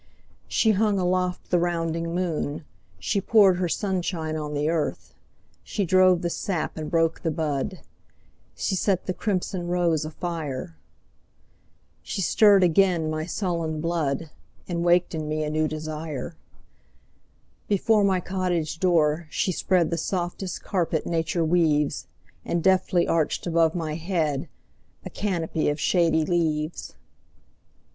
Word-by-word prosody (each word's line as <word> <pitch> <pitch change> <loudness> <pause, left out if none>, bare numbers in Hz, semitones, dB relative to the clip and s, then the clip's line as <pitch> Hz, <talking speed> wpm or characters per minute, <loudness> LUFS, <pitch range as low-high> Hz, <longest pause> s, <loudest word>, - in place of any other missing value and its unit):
She 220 - +3
hung 210 0 +2
aloft 180 0 -1
the 175 - +4
rounding 165 -1 -1
moon, 165 -4 -2 0.3
She 95 - -1
poured 200 -3 +5
her 180 -1 -1
sunshine 175 -5 -2
on 150 -1 -4
the 145 +1 0
earth, 160 -1 -2 0.5
She 200 - -2
drove 185 0 +4
the 175 - 0
sap 175 -3 -2
and 155 -1 -5
broke 165 -1 +1
the 165 - 0
bud, 155 +2 -2 0.7
She 195 - -1
set 190 -1 0
the 185 - -1
crimson 185 -3 -2
rose 175 -3 +1
afire. 155 - -5 1.3
She - - -5
stirred 200 +3 +5
again 175 -2 +3
my 155 +1 -3
sullen 170 -4 -2
blood, 165 -2 -1 0.4
And 170 -2 -2
waked 175 +1 +3
in 155 -2 -3
me 155 0 -1
a 150 - -2
new 155 0 +1
desire. 155 -1 -5 1.3
Before 210 +1 +3
my 190 -2 +3
cottage 175 -4 -2
door 165 -3 +2
she 185 - 0
spreadThe 170 -2 +1
softest 180 +1 -3
carpet 170 -4 -1
nature 165 0 0
weaves, 155 -3 +1 0.4
And 170 -1 -1
deftly 185 -2 +3
arched 160 -2 0
above 165 -1 +2
my 160 -3 -2
headA 160 -4 -1 0.7
canopy 170 -6 -1
of 145 +1 -2
shady 165 -2 +2
leaves. 155 -2 -1
170 Hz, 130 wpm, -25 LUFS, 155-185 Hz, 1.3 s, poured